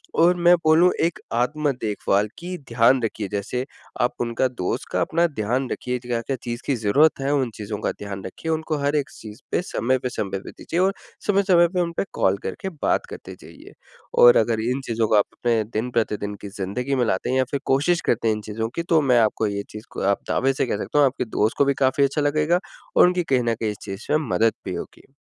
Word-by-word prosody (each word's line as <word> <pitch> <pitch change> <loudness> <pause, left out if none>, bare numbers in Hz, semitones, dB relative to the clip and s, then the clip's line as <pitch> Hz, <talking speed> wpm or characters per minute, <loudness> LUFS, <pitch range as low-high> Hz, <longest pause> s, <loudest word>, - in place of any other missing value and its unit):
और 175 +2 +5
मैं 175 0 +5
बोलूँ 165 +3 +6
एक 165 0 0
आत्म-देखभाल 120 -6 0
की 180 +1 -5
ध्यान 115 +2 +4
रखिए 110 -2 -2
जैसे 105 +5 -2 0.4
आप 120 0 +2
उनका 120 +2 +1
दोस्त 120 -8 -3
का - - 0
अपना 170 +1 +2
ध्यान 125 -2 -2
रखिए 125 0 -2
क्या-क्या 120 +1 -3
चीज़ 120 0 -4
की 140 - +1
ज़रूरत 125 +9 +3
है 135 +1 0
उन 135 -4 +1
चीज़ों 105 0 -5
का - - 0
ध्यान 100 -2 -7
रखिए, 160 - -5
उनको 160 -1 -1
हर 145 +1 +1
एक 140 -2 0
चीज़ 110 0 -11
पे - - +1
समय 130 -7 0
पे, 125 0 -3
समय 100 -5 -3
पे - - -10
दीजिए 170 - -4
और 190 +2 +3 0.3
समय-समय 190 -4 +4
पे 180 0 0
उन 170 -1 -1
पे - - +2
कॉल 95 +1 +2
करके 145 - -4
बात - - +2
करते - - -9
जाइए। - - -14 0.5
और 120 0 +9
अगर 110 0 +2
इन 130 +2 -1
चीज़ों 115 -1 0
को 105 - +2
आप 105 - +5
अपने 115 -2 0
दिन-प्रतिदिन 110 -3 -1
की 100 - -7
ज़िंदगी 125 +8 -2
में 125 -2 +2
लाते 95 -4 -1
हैं 130 - +1
या 130 - +4
फिर 140 - -1
कोशिश 150 +6 +2
करते 115 -1 +1
हैं 110 - +3
इन 105 - -6
चीज़ों 110 +1 -2
की 170 - -2
तो 160 - +5
मैं 125 -4 +4
आपको 110 0 +1
ये 100 0 -3
चीज़ 105 +1 -9
को - - -6
आप 100 - 0
दावे 135 +1 +2
से 135 - 0
कह 110 - -1
सकता 150 - -1
हूँ 145 - +6
आपके 130 -1 -3
दोस्त 110 -1 0
को 140 - +4
भी 140 - +2
काफ़ी 130 +1 +3
अच्छा 140 +2 +1
लगेगा, 155 +4 +2 0.4
और - - +7
उनकी 180 0 +1
कहीं 130 -6 +1
न 115 -1 0
कहीं 110 -1 -2
इस 105 - -8
चीज़ 95 +1 -7
में 150 - +5
मदद 115 0 +3
भी - - -3
होगी। - - -9
125 Hz, 230 wpm, -23 LUFS, 110-150 Hz, 0.5 s, और